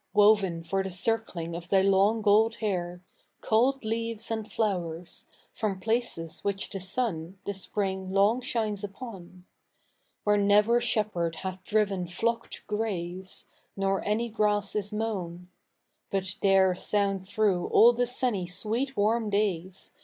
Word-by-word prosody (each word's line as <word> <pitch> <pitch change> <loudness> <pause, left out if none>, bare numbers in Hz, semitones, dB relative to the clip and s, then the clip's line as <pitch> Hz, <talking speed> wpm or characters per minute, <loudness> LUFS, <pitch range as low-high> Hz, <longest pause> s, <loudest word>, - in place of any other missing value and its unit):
Woven 205 -5 +4
for 195 +4 -1
the 190 - -3
circling 185 -3 -1
of 170 0 -7
thy 190 -1 +4
long 195 +3 +3
gold 215 +2 +4
hair. 180 -4 -3 0.4
Culled 250 +3 +2
leaves 230 0 -2
andjloxuers, 190 -6 -3 0.3
from 200 -4 -2
places 220 -7 -1
'which 200 -1 -1
I 195 - -4
he - - -6
sun 185 -4 -2
The 200 - -2
spring 190 -1 -3
long 205 +6 +3
shines 220 -4 -2
upon. 195 -4 -9 0.8
Where 210 0 +3
ntver 210 +4 +4
shepherd 205 -8 0
hath 185 0 -5
driven 200 -4 +1
flock 230 +6 -1
to - - -8
gra 215 +1 -1
.e, 175 0 -5 0.5
Nor 195 0 0
any 215 +3 0
grass 210 -2 0
is 205 0 -1
mo'un; 185 -5 -4 0.6
But 190 0 -2
there 190 -1 +5
soujid 195 0 -1
through 200 -4 +1
all 235 +2 +7
the 245 +1 0
sunny 240 -7 0
sweet 225 +9 -2
warm 215 +2 +2
days. 190 -3 -1
200 Hz, 140 wpm, -28 LUFS, 185-220 Hz, 0.8 s, all